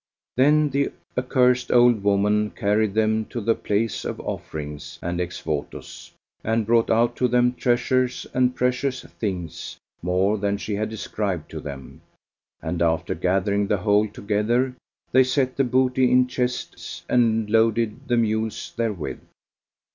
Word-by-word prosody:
Then 150 +3 +4
the 140 +1 0 0.2
accursed 125 -1 +2
old 120 -4 +5
woman 105 +1 +2
carried 105 -1 0
them 110 0 +2
to 120 - -5
the 115 +1 +2
place 110 +1 -1
of - - -4
offerings 75 -1 -6
and 85 +1 -2
ex 90 0 -4
votos, 75 -2 -5 0.3
and 110 0 0
brought 115 +1 +3
out 120 +1 +3
to 125 - +2
them 125 0 +3
treasures 125 +1 +1
and 125 0 +2
precious 125 +1 0
things 90 -7 -5 0.2
more 95 +4 +1
than 100 0 0
she 100 +2 -4
had 110 +2 -1
described 100 -6 -4
to - - -5
them; 70 -2 -9 0.6
and 85 +1 -3
after 80 -1 +1
gathering 100 +2 0
the 105 - +1
whole 105 +2 +2
together, 110 +5 0 0.4
they 130 +1 +6
set 130 0 0
the 135 - +2
booty 130 0 +2
in 125 0 +5
chests 125 0 -4
and 115 -3 +2
loaded 115 -1 +1
the 120 - +2
mules 110 -1 -1
therewith. 105 -8 -3
110 Hz, 145 wpm, -23 LUFS, 100-125 Hz, 0.6 s, they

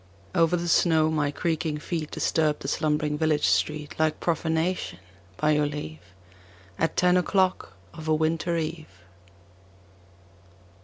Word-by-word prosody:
Over 170 -1 +3
the 175 0 -3
snow 160 -2 +3
my 150 -2 +1
creaking 155 0 -2
feet 155 0 -4
Disturbed 155 -2 0
the - - -4
slumbering 150 0 0
village 155 -2 +2
street 150 -1 0
Like 155 -1 +1
profanation, 165 +2 -1 0.4
by 155 0 +2
your 150 -1 +2
leave, 80 - -6 0.8
At 165 - 0
ten 180 0 +4
o'clock 185 - +1 0.2
of 160 - -9
a 155 - +3
winter 165 +2 0
eve. 160 0 -4
160 Hz, 125 wpm, -26 LUFS, 150-165 Hz, 0.8 s, ten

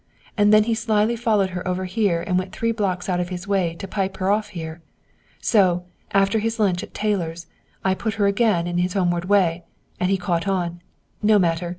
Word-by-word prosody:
And 205 -1 +4
then 215 0 +7
he 230 +1 0
slyly 225 0 +1
followed 215 -5 +1
her 180 0 -5
over 185 +1 -1
here 185 -3 0
and 180 - -1
went 185 0 -5
three 230 0 0
blocks 195 -5 -2
out 180 -2 0
of 175 0 -2
his 180 +1 -6
way 185 -4 0
to 195 - -7
pipe 195 -1 -2
her 190 +1 +1
off 210 +1 +1
here! 165 -4 -7 0.6
So, 185 -6 +3 0.3
after 195 +3 +2
his 225 +1 -2
lunch 185 -4 +2
at - - -10
Taylor's, 175 -6 -2 0.4
I 190 - +3
put 215 +2 -3
her 205 -2 +1
again 200 -4 +2
onto 175 0 0
his 180 0 -1
homeward 175 -2 0
way! 185 -4 +2 0.4
And 180 - +1
he's 195 - +2
caught 175 0 -1
on! 175 -3 -1 0.4
No 210 0 +5
matter! 170 -2 +1
190 Hz, 210 wpm, -22 LUFS, 175-210 Hz, 0.6 s, then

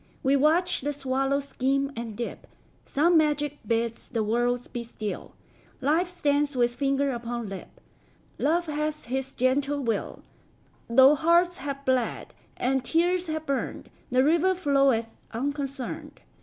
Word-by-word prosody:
We 270 +1 +4
watch 330 +6 +3
the 290 +2 -2
swallow 270 0 0
skim 275 0 0
and 230 -2 -6
dip; 240 - -5 0.4
Some 325 +4 +4
magic 295 -1 0
bids 230 0 -1
the 230 -3 -1
world 240 +3 0
be 240 - -3
still; 215 -3 -6 0.5
Life 320 +7 +1
stands 290 -4 0
with 240 -1 +2
finger 275 +1 +1
upon 235 -1 -4
lip; 195 -1 -9 0.6
Love 335 +4 +2
hath 305 0 -3
his 265 +2 -2
gentle 275 +3 +1
will; 225 -4 -2 0.7
Though 265 +4 +7
hearts 340 +3 +3
have 275 0 -5
bled, 255 -3 0 0.2
and 265 +1 +1
tears 350 +5 +1
have 315 0 -3
burned, 275 -2 -3 0.2
The 255 0 +3
river 340 +5 +3
floweth 275 -9 +2 0.2
unconcerned. 275 +1 -4
275 Hz, 135 wpm, -27 LUFS, 245-300 Hz, 0.7 s, Though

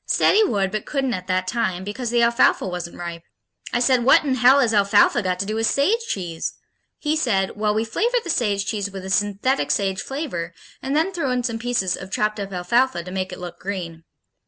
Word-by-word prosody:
Said - - +3
he 435 - +5
would 200 - 0
but 215 -1 -4
couldn't 270 -3 -1
at 185 -2 -5
that 185 0 0
time 190 -5 -1
because 225 +5 -4
the 240 0 +2
alfalfa 235 +1 +3
wasn't 180 -2 -5
ripe. 170 -1 -6 0.5
I 240 - +1
said, 250 0 +3
"What 315 +7 +6
in 270 - +1
hell 255 +2 +5
has 240 -5 +2
alfalfa 205 +3 +4
got 185 -2 -1
to 200 - -2
do 215 - -3
with 225 0 +1
sage 400 - +2
cheese?" 170 -4 -3 0.4
He 300 0 -1
said, 200 -11 +1
"Well, 210 0 0
we 220 +1 0
flavor 470 - 0
the 345 - -2
sage 205 -6 0
cheese 205 -1 -2
with 190 -1 -8
a 190 - -5
synthetic 205 +7 0
sage 195 -1 0
flavor 205 - -5 0.3
and 270 +2 -2
then 330 +5 +1
throw 330 -7 -1
in 250 -1 0
some 230 -2 -2
pieces 230 -6 0
of 190 - -9
chopped 210 +2 -1
up 200 -1 -5
alfalfa 185 +2 +1
to 180 - -9
make 185 0 -3
it - - -7
look 175 -1 -8
green." 175 -4 -5
210 Hz, 225 wpm, -22 LUFS, 185-250 Hz, 0.5 s, What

